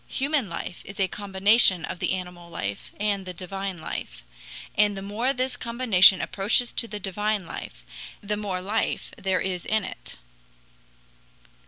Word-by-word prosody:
Human 275 -5 0
life 170 +1 -6
is 195 +1 -10
a 190 - +3
combination 195 -1 +4
of 180 - -6
the - - 0
animal 180 -2 -6
life 100 -11 -5
and 205 -2 0
the 180 -1 -7
divine 195 +1 -5
life. 60 - -6 0.5
And 205 -1 +3
the 195 - -5
more 220 +6 0
this 255 -1 -1
combination 230 -7 +5
approaches 210 +5 +2
to 230 - -1
the 210 -2 -6
divine 205 +1 -1
life, - - -8 0.4
the 210 0 -2
more 200 -3 -3
life 210 +4 -2
there 190 -1 0
is 180 -2 -2
in 215 -1 +1
it. - - -9
195 Hz, 155 wpm, -26 LUFS, 185-215 Hz, 0.5 s, combination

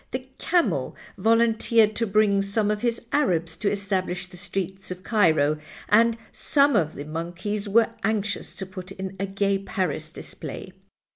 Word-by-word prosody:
The 255 0 -5
camel 350 -1 +1 0.2
volunteered 225 -1 +3
to 230 - +1
bring 200 -1 +3
some 205 +1 +1
of 210 0 -2
his 235 -1 -1
Arabs 170 - +1
to 205 - +1
establish 190 -3 -2
the 180 - -14
Streets 190 +1 -4
of 185 0 -6
Cairo, 155 -9 +3 0.3
and 230 +2 +5
some 285 -2 +3
of 160 -6 +1
the 145 - -6
monkeys 175 +7 -4
were 230 +2 +4
anxious 210 -1 -1
to 190 - -5
put 185 0 -9
in 190 0 -6
a 195 - -1
Gay 195 0 0
Paris 190 -4 -2
display. - - -8
200 Hz, 155 wpm, -25 LUFS, 185-220 Hz, 0.3 s, and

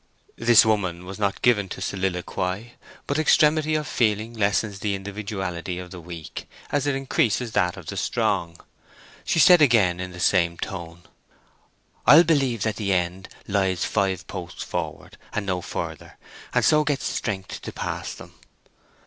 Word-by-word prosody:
This 115 -1 +6
woman 95 -5 0
was 95 +3 -8
not 100 -2 -1
given 105 -5 +3
to - - -6
soliloquy; 95 +3 -3 0.3
but 140 +2 -1
extremity 155 0 +3
of 155 -1 -1
feeling 110 0 0
lessens 100 -2 0
the 100 -1 -1
individuality 95 -3 -5
of 90 -1 -8
the 90 - -8
weak, 85 -1 -8 0.2
as 145 -1 0
it 140 - +1
increases 125 -3 0
that 90 -1 +1
of 90 - -10
the - - -6
strong. 100 -8 -1 0.7
She - - 0
said 175 +1 +7
again 105 -10 +4
in 90 0 -4
the 90 0 -10
same 85 -2 +2
tone, 85 -2 -7 1.0
"I'll 150 +6 +9
believe 135 - +1
that 110 -2 -1
the 100 -3 -1
end 90 0 -1 0.2
lies 95 -3 +1
five 95 -3 0
posts 90 0 -7
forward, - - -5
and 105 - -2
no 90 -2 -1
further, - - -6 0.3
and - - +2
so 150 -1 +5
get 145 -2 -1
strength 95 -4 -3
to - - -6
pass - - -4
them." - - -13
100 Hz, 155 wpm, -24 LUFS, 90-120 Hz, 1.0 s, I'll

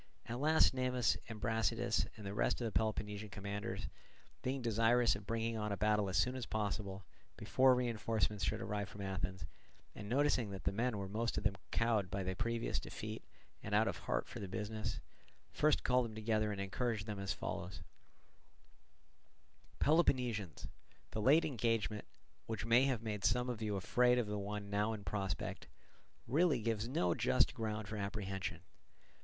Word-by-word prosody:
At 120 +2 -4
last 155 +1 +5
Cnemus 125 -3 +2
and 110 -1 -6
Brasidas 110 -2 +1
and 105 - -9
the 100 - -4
rest 105 - +1
of 120 - -2
the 115 - -1
Peloponnesian 105 -1 -1
commanders, 100 +1 -4 0.6
being 130 0 -2
desirous 115 +1 +4
of 100 -1 -9
bringing 115 0 -1
on 105 -1 -2
a 100 - -1
battle 105 -2 +2
as 95 - 0
soon 125 +5 +2
as 130 -2 -4
possible, 100 -2 -2 0.3
before 130 0 +4
reinforcements 110 -4 0
should - - 0
arrive 105 0 -2
from 100 - -9
Athens, 95 -1 -3 0.5
and 100 - -8
noticing 130 -3 +2
that 95 -1 -6
the - - +1
men 115 +2 0
were 100 -1 -3
most 115 +4 -1
of - - -1
them 100 -2 +2
cowed 110 -5 +1
by 100 0 -2
the 95 0 -1
previous 115 +1 -1
defeat - - -6 0.4
and - - -1
out - - +4
of - - -2
heart - - -1
for - - -7
the 100 - -4
business, 110 +3 -3 0.5
first 155 0 +3
called 125 -1 +3
them 110 -2 -7
together 110 -1 +1
and 100 - -4
encouraged 105 +2 -1
them 105 -2 -4
as 100 0 -2
follows: 85 0 -4 1.9
"Peloponnesians, 125 - +2 0.4
the 110 - -2
late 145 +9 +6
engagement, 115 -5 0 0.4
which 110 -1 -3
may 120 +3 +5
have 125 -5 0
made 105 -3 -3
some 125 +4 +2
of 115 -2 -6
you 105 -2 -1
afraid 125 +6 +3
of 120 - +2
the 105 0 -3
one 100 0 -4
now 105 +2 +1
in 105 -2 -6
prospect, 95 -3 -3 0.6
really 155 +4 +3
gives 110 0 -1
no 90 -8 +2
just - - +3
ground 110 -2 -3
for 105 +1 -4
apprehension. 95 -5 -3
110 Hz, 170 wpm, -36 LUFS, 100-120 Hz, 1.9 s, late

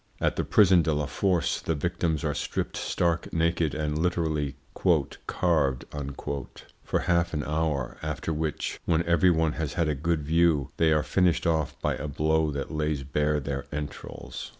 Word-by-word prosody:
At - - +1
the - - 0
prison 95 -4 +5
de 80 -1 +1
la 75 0 0
Force 90 +1 0
the 80 - -1
victims 80 0 -1
are - - 0
stripped - - -3
stark 85 -2 0
naked 80 -2 +1
and 75 0 -1
literally 80 -5 0 0.7
"carved" 75 -8 +1 1.0
for - - 0
half 85 -1 +1
an 75 - -1
hour, 75 -4 -1
after 75 +1 -3
which, 80 -1 -2
when 85 0 +2
every 85 +1 +4
one 80 -2 +2
has 80 -2 -3
had 85 -2 +1
a 75 - +1
good 80 +2 -1
view, 80 -2 +2
they 80 -1 +4
are 75 -1 +3
finished 90 -3 +2
off 80 -3 0
by - - +1
a 75 - -4
blow 80 +2 +1
that 70 +1 -4
lays 75 -3 -1
bare 75 +2 +1
their 70 -1 -4
entrails. 75 0 -6
80 Hz, 170 wpm, -27 LUFS, 75-85 Hz, 1.0 s, prison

